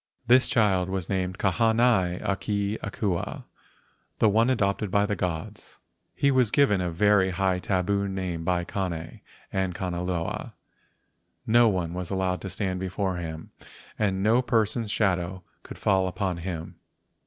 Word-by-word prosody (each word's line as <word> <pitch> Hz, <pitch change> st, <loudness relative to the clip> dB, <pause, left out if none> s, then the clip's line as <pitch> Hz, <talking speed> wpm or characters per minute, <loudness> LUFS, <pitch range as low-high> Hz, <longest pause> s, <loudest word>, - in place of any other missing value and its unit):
This 125 Hz, +2 st, +5 dB
child 95 Hz, -5 st, +2 dB
was 95 Hz, -3 st, -3 dB
named 95 Hz, -1 st, -1 dB
Kahanai 110 Hz, -2 st, +2 dB
a 100 Hz, -, +1 dB
ke 100 Hz, +1 st, -2 dB
Akua 100 Hz, -4 st, -3 dB, 0.7 s
(the 110 Hz, -, +4 dB
one 115 Hz, +4 st, +3 dB
adopted 105 Hz, -4 st, 0 dB
by 100 Hz, +1 st, +2 dB
the 105 Hz, 0 st, -1 dB
gods). 85 Hz, -5 st, -5 dB, 0.4 s
He 140 Hz, -, +2 dB
was 130 Hz, -4 st, +3 dB
given 105 Hz, -7 st, +3 dB
a 90 Hz, -, -1 dB
very 95 Hz, +2 st, +3 dB
high 95 Hz, 0 st, 0 dB
tabu 100 Hz, +2 st, 0 dB, 0.3 s
by 90 Hz, +1 st, 0 dB
Kane 85 Hz, -3 st, -4 dB, 0.3 s
and 95 Hz, -2 st, -1 dB
Kanaloa. 90 Hz, -2 st, -3 dB, 0.9 s
No 120 Hz, +1 st, +5 dB
one 90 Hz, -4 st, -2 dB
was 90 Hz, -1 st, -4 dB
allowed 95 Hz, -1 st, -1 dB
to 95 Hz, -, -5 dB
stand 95 Hz, 0 st, -2 dB
before 95 Hz, 0 st, -2 dB
him 80 Hz, -2 st, -6 dB, 0.5 s
and 95 Hz, -3 st, 0 dB
no 115 Hz, +4 st, +4 dB
person's 115 Hz, -2 st, 0 dB
shadow 95 Hz, -3 st, 0 dB, 0.2 s
could -, -, -10 dB
fall 95 Hz, -2 st, +2 dB
upon 95 Hz, -1 st, -2 dB
him. 85 Hz, -1 st, -6 dB
95 Hz, 145 wpm, -26 LUFS, 90-105 Hz, 0.9 s, This